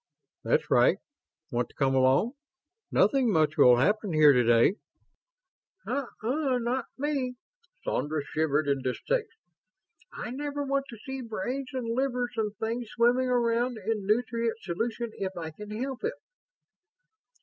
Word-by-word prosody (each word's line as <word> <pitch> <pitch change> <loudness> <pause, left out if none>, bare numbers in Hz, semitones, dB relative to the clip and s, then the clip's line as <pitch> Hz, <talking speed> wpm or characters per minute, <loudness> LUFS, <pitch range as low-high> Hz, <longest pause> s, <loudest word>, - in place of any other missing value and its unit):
"That's - - +1
right. - - +5 0.5
Want 120 0 -1
to - - -23
come 135 -1 +1
along? 130 - +3 0.6
Nothing 265 -5 +3
much 155 -4 +2
will 125 -6 +7
happen 205 - +1
here 150 -2 +7
today." 120 - +4 1.1
"Uh 270 +1 -2 0.2
uh, 260 +2 +1
not 245 +1 -1
me." 270 -3 -1 0.5
Sandra 150 0 -1
shivered 155 -1 0
in 140 -1 +1
distaste. 440 - -1 0.8
"I - - -6
never 285 +2 -3
want 275 0 0
to 235 - -9
see 265 0 -5
brains 245 +4 -4
and 255 -3 -3
livers 250 -2 -1
and 215 -2 -1
things 230 +2 -3
swimming 245 +3 +2
around 240 0 +1
in 210 -1 -3
nutrient 230 +1 0
solution 225 +6 -3
if 190 -1 -3
I 160 -2 -5
can 210 +6 -10
help 255 +5 -4
it." 460 - 0
230 Hz, 140 wpm, -28 LUFS, 160-255 Hz, 1.1 s, will